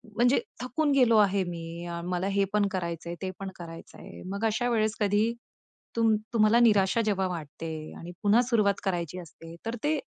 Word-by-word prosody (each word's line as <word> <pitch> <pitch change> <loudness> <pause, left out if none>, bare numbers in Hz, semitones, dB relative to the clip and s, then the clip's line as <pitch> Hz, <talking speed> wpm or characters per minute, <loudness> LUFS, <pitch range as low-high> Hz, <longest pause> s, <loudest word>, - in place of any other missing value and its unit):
म्हणजे 245 +3 +4 0.2
थकून 285 +4 0
गेलो 250 -5 +5
आहे 200 -2 +4
मी, 170 0 -6 0.2
मला 180 +1 -1
हे 200 0 +2
पण 210 -1 +3
करायचंय, 170 -2 -4
ते 190 -1 -3
पण 195 -1 -4
करायचंय. 165 -1 -10
मग 200 +3 -2
अशा 235 +3 +1
वेळेस 220 -2 +1
कधी 210 +3 +2 0.6
तुम 225 -1 +4 0.2
तुम्हाला 220 +1 +5
निराशा 215 -2 +4
जेव्हा 195 -3 +1
वाटते 165 -2 -6 0.3
आणि 170 - -8
पुन्हा 210 +4 +5
सुरुवात 220 -5 +3
करायची 175 -2 -2
असते, 165 -1 -11
तर 230 +1 -2
ते 300 0 +1
200 Hz, 165 wpm, -28 LUFS, 175-230 Hz, 0.6 s, गेलो